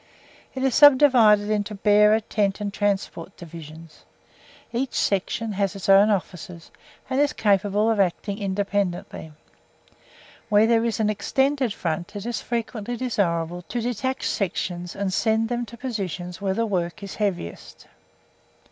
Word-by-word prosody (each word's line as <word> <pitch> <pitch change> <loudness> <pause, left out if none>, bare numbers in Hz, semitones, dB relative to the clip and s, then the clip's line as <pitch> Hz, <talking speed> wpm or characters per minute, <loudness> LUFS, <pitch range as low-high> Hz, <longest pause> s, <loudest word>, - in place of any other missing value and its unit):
It 260 - -3
is 265 -2 +2
subdivided 250 -8 +6
into 210 0 -1
Bearer, 210 +2 +4
Tent 205 -2 -1
and 205 -1 -4
Transport 195 -3 -2
Divisions. 165 -2 -12 0.7
Each 250 +2 -2
section 210 +3 -1
has 200 0 -1
its 195 - -6
own 195 +2 +6
officers, 180 -4 -4 0.4
and 260 +1 -1
is 290 0 +2
capable 205 +1 +1
of 220 - 0
acting 195 +2 -1
independently. 195 -4 -2 1.2
Where 210 0 +5
there 230 0 +3
is 230 -2 -1
an 215 -1 +2
extended 265 +3 0
front, 175 +1 -4
it 205 +1 -6
is 240 0 -3
frequently 235 0 -4
desirable 175 -8 -1
to 240 - -2
detach 245 +2 -2
sections 175 -2 -3
and 195 -2 -2
send 220 +2 +1
them 240 -1 -2
to 235 - -11
positions 190 - -5
where 190 -1 -1
the 230 - 0
work 180 -3 -3
is 200 - -7
heaviest. 195 - -4
205 Hz, 140 wpm, -24 LUFS, 190-230 Hz, 1.2 s, subdivided